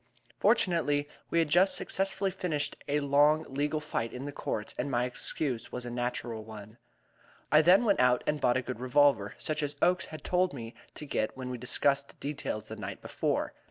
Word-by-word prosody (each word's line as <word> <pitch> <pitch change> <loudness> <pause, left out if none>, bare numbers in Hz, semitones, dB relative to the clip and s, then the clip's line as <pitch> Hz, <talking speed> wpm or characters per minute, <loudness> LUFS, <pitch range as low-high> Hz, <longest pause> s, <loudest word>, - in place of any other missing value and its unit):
Fortunately, 165 -9 +2 0.2
we - - 0
had 165 -2 +3
just 180 +5 +5
successfully 195 0 -1
finished 165 -6 -2
a 145 +1 +1
long 145 +3 +4
legal 145 +3 -1
fight 135 -6 -3
in 125 +2 -6
the 145 - -4
courts, 110 -5 -4
and 135 - -1
my 120 -2 +1
excuse 125 0 -3
was 125 0 -4
a 120 - -5
natural 120 -2 -3
one. 110 0 -11 0.7
I 155 - +7
then 185 +8 +6
went 200 -3 +3
out 125 -1 +4
and 150 -1 -1
bought 120 0 +3
a 130 - -2
good 125 -2 -5
revolver, 130 -5 +3
such 155 0 -2
as 145 -1 -2
Oakes 180 +1 +2
had 155 -1 -10
told 180 -1 +1
me 115 -2 -7 0.2
to 150 - -8
get 110 -5 -2
when 130 -1 -5
we 125 - -5
discussed 140 +3 0
details 140 -7 -4
the - - -5
night - - -6
before. - - -2
145 Hz, 195 wpm, -30 LUFS, 125-155 Hz, 0.7 s, I